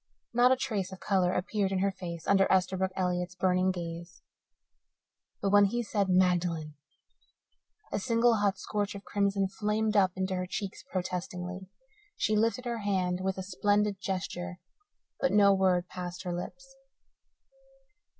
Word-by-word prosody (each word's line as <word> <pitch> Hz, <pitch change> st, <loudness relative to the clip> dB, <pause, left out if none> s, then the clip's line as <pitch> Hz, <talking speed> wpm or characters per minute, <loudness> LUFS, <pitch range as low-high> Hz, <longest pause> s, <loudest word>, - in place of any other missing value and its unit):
Not 245 Hz, +2 st, +5 dB
a -, -, +6 dB
trace 215 Hz, -8 st, -2 dB
of 190 Hz, -, -9 dB
colour 185 Hz, -3 st, +2 dB
appeared 195 Hz, +1 st, -1 dB
in 190 Hz, -, 0 dB
her 195 Hz, +1 st, +1 dB
face 170 Hz, -3 st, -7 dB
under 195 Hz, -1 st, +4 dB
Esterbrook 190 Hz, 0 st, +2 dB
Elliott's 180 Hz, -1 st, -1 dB
burning 185 Hz, 0 st, +2 dB
gaze. 170 Hz, 0 st, -6 dB, 1.2 s
But 195 Hz, -, +1 dB
when 205 Hz, 0 st, +7 dB
he 240 Hz, +4 st, -1 dB
said 205 Hz, -3 st, 0 dB
"Magdalen!" 175 Hz, -4 st, +2 dB, 1.2 s
a -, -, -1 dB
single, 230 Hz, +1 st, +3 dB
hot 200 Hz, -2 st, +1 dB
scorch 205 Hz, +1 st, -3 dB
of 200 Hz, -, -8 dB
crimson 200 Hz, -1 st, 0 dB
flamed 210 Hz, +2 st, -1 dB
up 190 Hz, -2 st, +4 dB
into 190 Hz, 0 st, -1 dB
her 185 Hz, 0 st, -2 dB
cheeks 200 Hz, +1 st, -5 dB
protestingly. 180 Hz, 0 st, -4 dB, 0.5 s
She 215 Hz, -, +1 dB
lifted 230 Hz, +4 st, +1 dB
her 235 Hz, -1 st, -2 dB
hand 185 Hz, -3 st, 0 dB
with 190 Hz, 0 st, -1 dB
a 190 Hz, -, -4 dB
splendid 205 Hz, +1 st, +1 dB
gesture, 180 Hz, -2 st, -4 dB, 0.6 s
but 270 Hz, -, +2 dB
no 200 Hz, -1 st, +6 dB
word 185 Hz, -2 st, +2 dB
passed 180 Hz, 0 st, -6 dB
her 180 Hz, -2 st, -3 dB
lips. 270 Hz, +10 st, -7 dB
190 Hz, 150 wpm, -30 LUFS, 180-205 Hz, 1.2 s, when